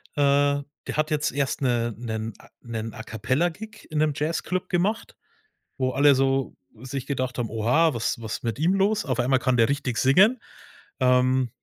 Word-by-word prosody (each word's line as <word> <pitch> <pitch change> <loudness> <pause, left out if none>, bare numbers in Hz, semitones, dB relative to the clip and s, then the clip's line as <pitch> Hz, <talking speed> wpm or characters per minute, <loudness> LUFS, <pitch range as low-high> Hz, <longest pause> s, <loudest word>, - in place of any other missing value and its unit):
Äh, 145 0 +3 0.3
der - - -4
hat 155 0 +1
jetzt 150 -2 0
erst 140 +1 -2
'ne 120 -3 0
'nen 110 -2 -4
A - - -18
'nen 115 -2 -5
A-Cappella-Gig 160 - -3
in 155 - -4
'nem 150 -1 +2
Jazzclub 170 +5 -2
gemacht, 195 +5 -1 0.6
wo 130 -1 0
alle 140 +1 +5
so 135 0 0 0.3
sich 130 0 -5
gedacht 130 -3 -3
haben: 120 -3 -3
„Oha, 125 +9 +2
was 115 0 -2
was 110 -1 -5
mit 115 -2 -3
ihm 170 +5 +2
los? 205 +2 +1
Auf 130 -3 -2
einmal 130 +2 +3
kann 125 -1 +1
der 115 +1 +4
richtig 140 -4 -2
singen“. 195 - +5 0.6
Ähm. 130 0 +3
135 Hz, 170 wpm, -25 LUFS, 120-155 Hz, 0.6 s, alle